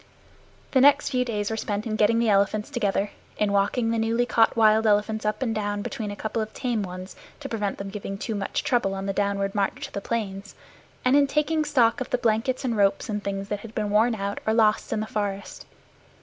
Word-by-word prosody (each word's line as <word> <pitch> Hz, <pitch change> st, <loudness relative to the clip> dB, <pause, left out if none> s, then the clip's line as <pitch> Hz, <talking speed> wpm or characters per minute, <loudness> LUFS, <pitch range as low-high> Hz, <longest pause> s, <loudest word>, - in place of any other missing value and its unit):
The 260 Hz, -, +4 dB
next 285 Hz, +1 st, +5 dB
few 255 Hz, -2 st, +1 dB
days 210 Hz, -4 st, -2 dB
were 220 Hz, -, -2 dB
spent 210 Hz, -1 st, -3 dB
in 220 Hz, -2 st, -2 dB
getting 215 Hz, +2 st, +3 dB
the 230 Hz, 0 st, +2 dB
elephants 205 Hz, +4 st, +1 dB
together, 205 Hz, -5 st, 0 dB, 0.3 s
in 210 Hz, -1 st, +1 dB
walking 225 Hz, +4 st, +1 dB
the 230 Hz, -, 0 dB
newly 230 Hz, +2 st, +1 dB
caught 230 Hz, -1 st, +3 dB
wild 220 Hz, 0 st, +5 dB
elephants 215 Hz, +1 st, +1 dB
up 215 Hz, +5 st, -1 dB
and 230 Hz, -3 st, -1 dB
down 205 Hz, -1 st, -2 dB
between 215 Hz, -3 st, -4 dB
a 205 Hz, -, -5 dB
couple 220 Hz, +2 st, -3 dB
of 215 Hz, 0 st, -4 dB
tame 240 Hz, -4 st, -1 dB
ones 185 Hz, 0 st, -7 dB, 0.2 s
to 285 Hz, -, -6 dB
prevent 210 Hz, -5 st, -2 dB
them 195 Hz, 0 st, -6 dB
giving 195 Hz, -1 st, -5 dB
too 220 Hz, -, -4 dB
much 200 Hz, -2 st, -2 dB
trouble 195 Hz, -6 st, +1 dB
on 195 Hz, 0 st, -4 dB
the 195 Hz, -, -1 dB
downward 200 Hz, 0 st, 0 dB
march 200 Hz, -2 st, -1 dB
to -, -, -10 dB
the 200 Hz, -, -3 dB
plains, 200 Hz, -3 st, -4 dB, 0.5 s
and 250 Hz, +2 st, +4 dB
in 285 Hz, -1 st, +5 dB
taking 305 Hz, +2 st, +1 dB
stock 265 Hz, -4 st, +2 dB
of 255 Hz, -, -3 dB
the -, -, +1 dB
blankets 240 Hz, +3 st, 0 dB
and 235 Hz, -3 st, 0 dB
ropes 200 Hz, +3 st, +2 dB
and 210 Hz, -1 st, -3 dB
things 195 Hz, 0 st, -3 dB
that 205 Hz, -, -2 dB
had 225 Hz, +1 st, -11 dB
been 210 Hz, -1 st, -1 dB
worn 225 Hz, +3 st, +3 dB
out 200 Hz, -1 st, -3 dB
or 220 Hz, -, +3 dB
lost 215 Hz, -2 st, +2 dB
in 215 Hz, -, 0 dB
the -, -, -2 dB
forest. 205 Hz, -3 st, -4 dB
215 Hz, 230 wpm, -25 LUFS, 200-235 Hz, 0.5 s, next